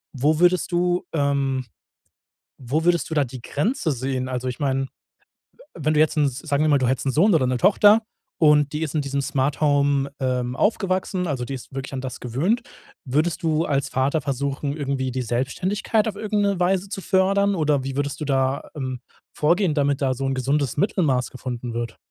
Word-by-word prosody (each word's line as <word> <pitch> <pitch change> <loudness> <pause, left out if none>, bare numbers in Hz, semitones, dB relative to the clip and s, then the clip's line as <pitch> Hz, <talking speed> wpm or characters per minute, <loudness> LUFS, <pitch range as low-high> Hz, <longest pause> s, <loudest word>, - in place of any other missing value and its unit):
Wo 150 +4 +2
würdest 180 +1 +3
du, 175 +1 +1
ähm 140 -3 0 0.9
wo 140 +5 -1
würdest 175 -1 +2
du - - -2
da 150 - +3
die 125 -1 -9
Grenze 170 - -1
sehen? 130 0 -2
Also 130 0 -3
ich 125 - -5
meine, 135 -1 0
w - - -8 0.9
wenn 155 -1 0
du 150 - +3
jetzt 155 0 +3
'n 145 - +4
sagen 145 +3 -1
wir 155 - +2
mal, 145 - +5
du 125 - +1
hättest 130 +1 -1
'n 135 - +2
Sohn 185 +9 +4
oder 130 -5 +2
'ne 125 0 0
Tochter 205 - +5 0.4
und 150 -2 +4
die 155 - -1
ist 155 -2 -4
in 155 - +2
diesem 140 0 -2
Smart-Home, 140 0 +1
ähm, 125 -1 -1
aufgewachsen, 190 -2 0
also 130 -5 -2
die 135 +2 -4
ist 130 - -11
wirklich 135 0 -6
an 130 - -3
das 130 -1 -6
gewöhnt, 160 - 0 0.4
würdest 155 +6 0
du 160 0 +1
als 140 -3 0
Vater 140 +4 0
versuchen, 140 +1 -2
irgendwie 135 -3 -2
die 130 0 -2
Selbstständigkeit 185 - 0
auf 215 - -3
irgendeine 205 -3 0
Weise 190 +2 +1
zu 195 - -5
fördern? 195 +1 +2
Oder 150 -4 +1
wie 135 0 -4
würdest 145 +2 -2
du - - -2
da, 135 -1 0
ähm, 130 -4 -4 0.4
vorgehen, 170 +2 +2
damit 145 -1 +1
da 130 -1 +2
so 135 +2 -4
'n 135 - -1
gesundes 140 0 0
Mittelmaß 150 - +1
gefunden 125 -2 -5
wird? 115 -1 -4
145 Hz, 195 wpm, -23 LUFS, 130-170 Hz, 0.9 s, mal